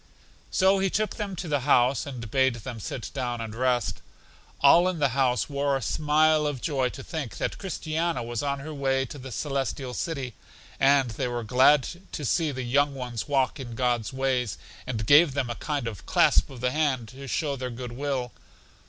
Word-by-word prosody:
So 190 +1 +3
he 195 0 +2
took 215 +3 -1
them 205 -3 -3
to 175 0 -5
the 145 -2 +1
house, 130 0 +3
and 120 -6 -7
bade 130 -2 +3
them 120 +1 -7
sit 115 +3 -5
down 125 -3 -2
and 110 -2 -5
rest. 125 0 0 0.6
All 170 +6 +7
in 185 -2 -1
the 145 -3 +2
house 125 -1 +1
wore 140 -1 0
a - - -6
smile 155 +3 +3
of 145 -3 -3
joy 135 -3 0
to - - -9
think 155 -7 -5
that - - -3
Christiana 165 -6 -2
was 120 -1 -3
on 140 -1 -2
her 155 +2 -7
way 135 -2 0
to 145 - -9
The 130 0 -8
Celestial 135 -1 -3
City, 135 -5 -3 0.5
and 135 -3 +4
they 125 +4 -2
were 120 -1 -3
glad 130 +4 +5 0.3
to 150 - -4
see 160 +4 +1
the 130 -2 -4
young 140 +3 +2
ones 125 -2 -5
walk 135 0 +1
in 120 -3 -7
God's 120 -2 0
ways, 130 -6 -1 0.3
and 110 -4 -2
gave 145 +2 +6
them 130 -4 -1
a - - -4
kind 145 -6 -2
of 95 -9 -7
clasp - - +4
of 130 -3 -10
the 125 0 +1
hand 135 -7 0
to 135 +4 -10
show 145 +1 -1
their 130 -1 -4
good 120 0 -6
will. 130 -1 -2
135 Hz, 200 wpm, -26 LUFS, 125-145 Hz, 0.6 s, All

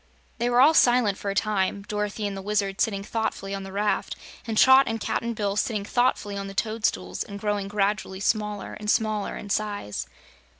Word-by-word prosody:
They 240 +1 +1
were 245 +1 +4
all 300 +4 +7
silent 240 -8 +4
for 200 - -3
a 195 - -2
time, 200 -1 0
Dorothy 210 +1 -3
and 200 -1 -2
the 195 - -5
Wizard 200 -1 -1
sitting 200 -3 0
thoughtfully 205 -2 -3
on 195 - -3
the 195 0 -8
raft, 205 +2 -1 0.3
and 220 -1 -2
Trot 265 +3 +7
and 225 0 -2
Cap'n 235 +2 -2
Bill 205 -2 -1
sitting 210 -1 -1
thoughtfully 245 -3 +1
on 195 - -5
the 195 - -8
toadstools 200 - -1
and 200 0 -5
growing 205 -1 -1
gradually 200 -1 -1
smaller 210 0 -1
and 210 0 -5
smaller 215 -2 0
in 205 - -7
size. 205 - -2
210 Hz, 190 wpm, -25 LUFS, 200-220 Hz, 0.3 s, all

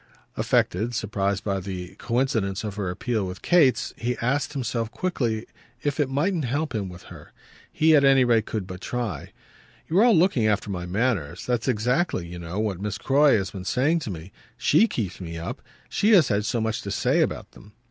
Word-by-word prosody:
Affected, 110 +7 +1
surprised 100 -2 -1
by 100 -2 -1
the 90 -2 -6
coincidence 115 -6 0
of 105 -2 -4
her 100 -3 -3
appeal 100 +2 -2
with 90 0 -8
Kate's, 145 -10 +3
he 120 +1 -2
asked 135 +4 -1
himself 120 -4 -2
quickly 120 -7 -2 0.4
if 145 0 -1
it 145 -3 +2
mightn't 155 +3 0
help 145 +5 -2
him 100 -4 -2
with 90 0 -11
her. - - -14 0.4
He 160 0 +4
at 145 - +5
any 135 -1 +6
rate 115 -3 +2
could 105 -4 -3
but 90 0 -8
try. 120 -5 -4 0.6
"You're 185 +7 +4
all 235 -6 +5
looking 160 - +3
after 105 -1 0
my 90 -2 -4
manners. 95 - -1
That's 120 -1 -1
exactly, 125 - 0
you 85 +1 -8
know, 85 +2 -6
what 100 -4 -2
Miss 105 0 -3
Croy 140 +1 +4
has 95 -2 -3
been 95 -2 -7
saying 135 - +1
to 150 - -6
me. 85 0 -7 0.3
SHE 200 +10 +4
keeps 100 - -4
me 85 -2 -6
up 80 - -6 0.3
she 215 +2 +2
has 170 -9 +6
had 105 -1 +1
so 120 - 0
much 110 0 -1
to 100 - -6
say 100 - +1
about - - -2
them." 105 +1 -16
110 Hz, 200 wpm, -25 LUFS, 95-135 Hz, 0.6 s, any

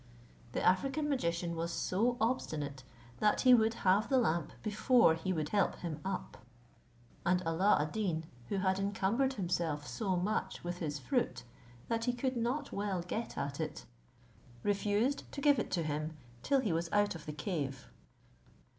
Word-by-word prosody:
The - - -1
African 275 +11 +2
magician 170 -11 -1
was 165 +1 -2
so 230 +9 +1
obstinate, 150 - -1 0.4
that 210 - +3
he 255 -1 +7
would 225 -1 +4
have 195 +4 +4
the 270 - +4
lamp 170 - +1
before 220 -2 +4
he 165 +3 -2
would 155 -4 -1
help 205 -1 +2
him 160 -3 -5
up; 185 - -5 0.8
and 180 +1 +2
Alla 170 +5 +4
ad 150 +1 -1
Deen, 180 -7 -1 0.3
who 200 - 0
had 190 0 +1
encumbered 205 +7 +1
himself 170 - -1
so 195 -1 -1
much 200 +5 -1
with 175 0 -4
his 150 -3 -2
fruit 245 - -1 0.4
that 230 0 -1
he 245 - +1
could 260 +1 -1
not 240 +5 -1
well 200 -3 -2
get 220 +6 -4
at 140 +1 -3
it, 155 - -4 0.8
refused 205 +6 0
to - - -4
give 285 0 +4
it - - -2
to 170 - 0
him 155 +1 -3 0.2
till 275 - +2
he 210 -9 0
was 165 +1 -1
out 205 0 +3
of 165 -3 -10
the - - -2
cave. 145 -6 -3
190 Hz, 165 wpm, -33 LUFS, 165-230 Hz, 0.8 s, he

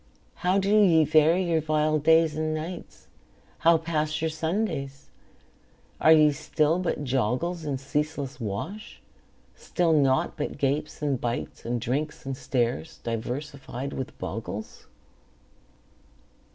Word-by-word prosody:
How 180 +2 +1
do 200 +2 +2
ye 165 -5 +5
vary 155 +4 +4
your 165 -3 +1
vile 155 0 +1
days 160 +1 +4
and 155 0 -1
nights? 165 +3 -7 0.5
How 165 0 +5
pass 155 -1 -1
your 160 0 -1
Sundays? 160 -5 -3 0.9
Are 160 - +5
ye 155 -2 +7
still 155 +2 0
but 175 -4 -2
joggles 135 +7 -1
In 140 -2 -1
ceaseless 145 0 -3
wash? 125 - -5 0.5
Still 170 -3 0
naught 135 -3 +2
but 150 - -3
gapes 145 +2 -1
and 140 -4 0
bites, 120 0 -4
And 120 +1 -1
drinks 140 +7 -3
and 135 0 -3
stares, 130 +4 -2
diversified 130 +3 -4
with 130 - -6
boggles? 110 -1 -6
150 Hz, 125 wpm, -26 LUFS, 135-160 Hz, 0.9 s, ye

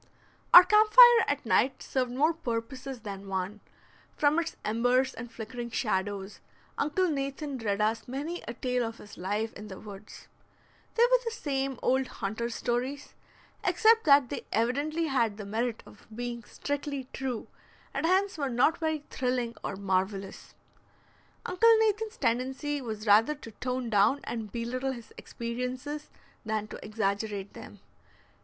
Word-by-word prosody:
Our 355 - +12
camp 425 +3 +4
fire 485 -2 +9
at 285 -2 -1
night 255 +4 +2
served 255 -2 -1
more 300 +6 +2
purposes 255 -2 -5
than 200 -2 -7
one; 190 +2 -3 0.6
from 300 +2 +3
its 330 -1 -3
embers 245 +4 +2
and 230 0 -8
flickering 235 +1 -6
shadows, 200 -3 -2 0.4
Uncle 305 +6 +1
Nathan 275 -2 -3
read 205 -3 -1
us 220 +1 0
many 295 +7 -4
a 235 - -5
tale 250 0 -1
of 225 0 -5
his 205 - -12
life 205 +5 -2
in 210 - -9
the 190 -2 -9
woods. 205 -1 -11 0.7
They 470 - +5
were - - +5
the 465 - -1
same 275 - -2
old 260 0 +2
hunter's 225 +3 -4
stories, 255 +4 -2 0.5
except 450 +1 +4
that 280 -4 +6
they - - -4
evidently 285 +9 0
had 235 -8 +1
the 210 - -7
merit 225 +3 -2
of - - -17
being 240 0 -5
strictly 285 -2 -4
true, 260 -4 -4 0.5
and - - -2
hence 380 -1 +2
were 280 -2 0
not 255 +7 +2
very 315 -2 -1
thrilling 250 -2 -1
or - - -3
marvelous. 190 0 -2 0.9
Uncle 455 +5 +5
Nathan's 440 0 0
tendency 265 +5 -1
was 220 -3 -6
rather 220 +8 +5
to 255 -6 -11
tone 250 +1 -3
down 210 +7 +3
and 220 -3 -5
belittle 255 +3 -2
his 235 -3 -11
experiences 250 +5 -5 0.3
than 215 -1 -2
to - - -9
exaggerate 205 -1 -2
them. - - -11
250 Hz, 150 wpm, -29 LUFS, 220-290 Hz, 0.9 s, Our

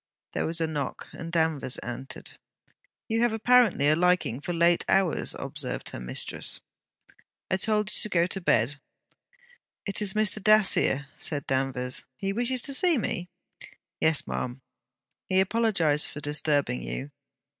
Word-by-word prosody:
There - - -1
was 165 +1 0
a 165 - +1
knock, 150 -4 -4
and 165 0 -8
Danvers 160 -6 0
entered. 120 +3 -7 0.7
'You 225 0 0
have 240 -2 +2
apparently 225 - +4
a 155 - +5
liking 180 -7 +1
for 175 - -4
late 170 0 +3
hours,' 190 -4 +2
observed - - -5
her - - -7
mistress. - - -4 0.9
'I 190 - +3
told 210 +1 0
you - - +1
to 215 - -1
go 170 -3 +3
to 190 +2 -4
bed.' 140 -2 +1 1.1
'It 200 +1 0
is 205 0 +1
Mr. 215 0 +3
Dacier,' 205 -9 +5
said 145 -2 -3
Danvers. 130 -1 -1
'He 195 0 -2
wishes 245 +3 0
to 280 - 0
see 340 +3 +3
me?' 180 -5 -3 0.7
'Yes, 160 -2 +2
ma'am. 120 - -4 0.7
He 185 - +3
apologized 190 -8 +2
for - - -8
disturbing 145 - +1
you.' - - -5
170 Hz, 145 wpm, -27 LUFS, 140-210 Hz, 1.1 s, a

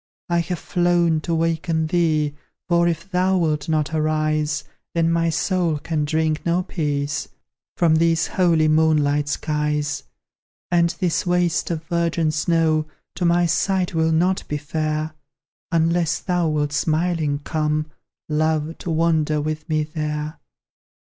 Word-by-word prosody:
I 170 0 +2
have 175 +1 -2
flown 175 -3 +1
to 170 +1 -1
waken 165 0 0
thee 155 -3 +1 0.3
For, 170 0 +3
if 170 +3 -3
thou 185 +1 +2
wilt 155 -4 0
not 155 0 0
arise, 155 -1 0 0.3
Then 165 0 +2
my 165 0 +2
soul 170 -1 0
can 150 0 -2
drink 155 +1 0
no 175 +2 +1
peace 145 -4 -2 0.5
From 160 -2 +4
these 165 0 +2
holy 170 -4 +2
moonlight 150 -2 +2
skies. 150 -1 -1 0.7
And 170 -1 +4
this 180 0 0
waste 175 -1 +1
of 165 -2 -3
virgin 170 -1 0
snow 155 -1 +1 0.3
To 180 - -2
my 175 +1 +3
sight 180 +3 0
will 160 0 +2
not 180 +4 +2
be 150 - -2
fair, 155 +1 -2 0.6
Unless 165 0 +1
thou 180 -3 0
wilt 145 -1 -1
smiling 155 -1 0
come, 150 +1 -1 0.4
Love, 155 +1 0
to - - -5
wander 160 -2 +2
with 155 +2 -4
me 155 -1 +1
there. 150 0 -4
160 Hz, 135 wpm, -22 LUFS, 155-170 Hz, 0.7 s, From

